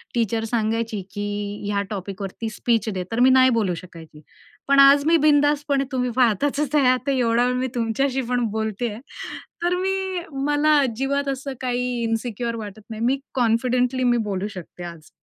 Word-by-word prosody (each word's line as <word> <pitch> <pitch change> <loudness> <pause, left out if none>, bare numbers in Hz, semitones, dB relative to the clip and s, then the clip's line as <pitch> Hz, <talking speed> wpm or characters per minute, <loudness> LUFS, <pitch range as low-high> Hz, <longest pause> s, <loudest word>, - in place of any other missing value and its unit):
Teacher 225 -1 0
सांगायची, 225 -1 -1
की 205 0 -4
ह्या 200 -1 0
टॉपिक 195 -1 -6
वरती 210 +3 -4
स्पीच 225 0 0
दे. 185 -3 -3
तर 230 - -1
मी 255 +1 +6
नाही 260 0 +6
बोलू 215 -7 +1
शकायची. 165 -3 -12 0.5
पण 280 0 +4
आज 280 +1 +7
मी 330 +1 +5
बिनधास्तपणे 290 -1 +3
तुम्ही 250 -1 0
पाहताच 255 +4 +2 0.2
आहे 255 -3 +5
ते 275 -1 +1
एवढा 235 0 +2
वेळ 250 - +1
मी 255 +1 0
तुमच्याशी 255 +4 0
पण 245 -1 +1
बोलतेय. 220 0 -2 0.7
तर 350 +1 +2
मी 380 0 -1 0.3
मला 295 +1 +3
अजिबात 270 +3 0
असं 270 0 -4
काही 250 -1 -1 0.2
इन्सिक्युअर 230 0 -2
वाटत 215 -1 -8
नाही. 220 0 -6
मी 265 +3 +2
कॉन्फिडेंटली 250 +1 +1
मी 240 -1 +3
बोलू 195 +1 -2
शकते 175 0 -9
आज. 170 -2 -9
240 Hz, 165 wpm, -23 LUFS, 215-270 Hz, 0.7 s, आज